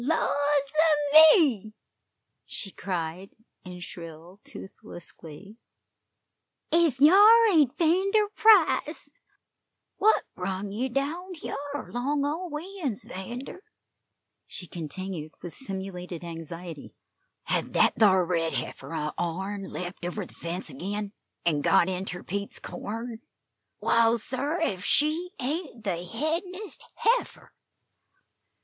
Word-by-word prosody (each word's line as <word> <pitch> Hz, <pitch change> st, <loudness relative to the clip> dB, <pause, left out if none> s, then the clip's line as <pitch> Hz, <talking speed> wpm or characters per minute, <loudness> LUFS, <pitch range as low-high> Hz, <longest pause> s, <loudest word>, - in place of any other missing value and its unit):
"Laws 320 Hz, +5 st, +1 dB
a 295 Hz, +1 st, +2 dB, 0.2 s
me!" 225 Hz, -, +1 dB, 0.7 s
she 195 Hz, -, -3 dB
cried, 180 Hz, 0 st, -5 dB, 0.3 s
in 180 Hz, -1 st, -9 dB
shrill, 170 Hz, +2 st, -10 dB
toothless 190 Hz, -3 st, -10 dB
glee; 185 Hz, +7 st, -12 dB, 1.1 s
"ef 330 Hz, -6 st, +3 dB
hyar 410 Hz, -, +8 dB
ain't 295 Hz, -4 st, +3 dB
'Vander 385 Hz, +6 st, +3 dB
Price! 355 Hz, -9 st, +4 dB, 0.9 s
What 435 Hz, +2 st, +4 dB
brung 190 Hz, +2 st, -4 dB
ye 245 Hz, +6 st, -2 dB
down 325 Hz, +8 st, -3 dB
hyar 285 Hz, -2 st, -6 dB
along 280 Hz, +4 st, -1 dB
o' 330 Hz, +5 st, -3 dB
we 365 Hz, +6 st, -7 dB
uns, 235 Hz, -8 st, -2 dB
'Vander?" 240 Hz, -, -7 dB, 0.9 s
she 180 Hz, -, -7 dB
continued, 170 Hz, -1 st, -6 dB
with 175 Hz, -, -6 dB
simulated 190 Hz, -, -5 dB
anxiety. 165 Hz, -1 st, -8 dB, 0.5 s
"Hev -, -, -1 dB
that -, -, +4 dB
thar 190 Hz, -4 st, +5 dB
red 165 Hz, -2 st, 0 dB
heifer 165 Hz, -, -5 dB
o' 150 Hz, -1 st, -2 dB
ourn 190 Hz, +4 st, -3 dB
lept 180 Hz, -1 st, -7 dB
over 175 Hz, 0 st, -3 dB
the -, -, -16 dB
fence 170 Hz, -1 st, -4 dB
agin, 200 Hz, +8 st, -4 dB, 0.3 s
an' 155 Hz, -4 st, +2 dB
got 170 Hz, -, +4 dB
inter 185 Hz, -1 st, -4 dB
Pete's 200 Hz, +2 st, -4 dB
corn? 225 Hz, +2 st, -6 dB, 0.6 s
Waal, 230 Hz, 0 st, +3 dB
sir, 275 Hz, -, -1 dB
ef 190 Hz, -, -1 dB
she 310 Hz, -, +2 dB
ain't 280 Hz, -3 st, -4 dB
the 175 Hz, -4 st, -2 dB
headin'est 335 Hz, -, -3 dB
heifer!" 475 Hz, +2 st, 0 dB
225 Hz, 115 wpm, -27 LUFS, -, 1.1 s, hyar